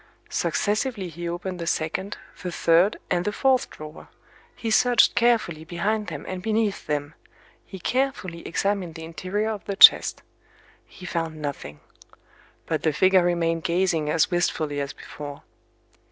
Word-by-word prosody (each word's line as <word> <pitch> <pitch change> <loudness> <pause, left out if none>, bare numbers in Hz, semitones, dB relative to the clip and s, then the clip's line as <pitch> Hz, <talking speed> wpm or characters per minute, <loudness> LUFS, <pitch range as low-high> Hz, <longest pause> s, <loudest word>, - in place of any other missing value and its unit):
Successively 210 -2 -1
he 170 +1 -5
opened 180 +1 -5
the 170 - -4
second, 180 +7 -2 0.2
the 180 - -4
third, 170 +4 +3
and 175 -1 +2
the 210 - -1
fourth 260 +3 +2
drawer;—he 155 +8 -10
searched 245 +2 +5
carefully 220 -10 +1
behind 200 +6 -2
them - - -6
and 185 -1 -5
beneath 220 -1 -1
them;—he 150 +5 -7
carefully 245 -7 -1
examined 190 -1 -1
the 160 - -8
interior 185 +6 -3
of 210 -2 -6
the 200 - -3
chest. - - +7 0.6
He 180 - -13
found 165 -2 -3
nothing. 135 - -6 0.8
But 160 -2 -1
the 155 - +1
figure 185 +4 +4
remained 165 -2 0
gazing 170 -3 +1
as 160 +3 +2
wistfully 155 -4 0
as 140 0 -4
before. 145 -1 -9
175 Hz, 140 wpm, -24 LUFS, 160-205 Hz, 0.8 s, chest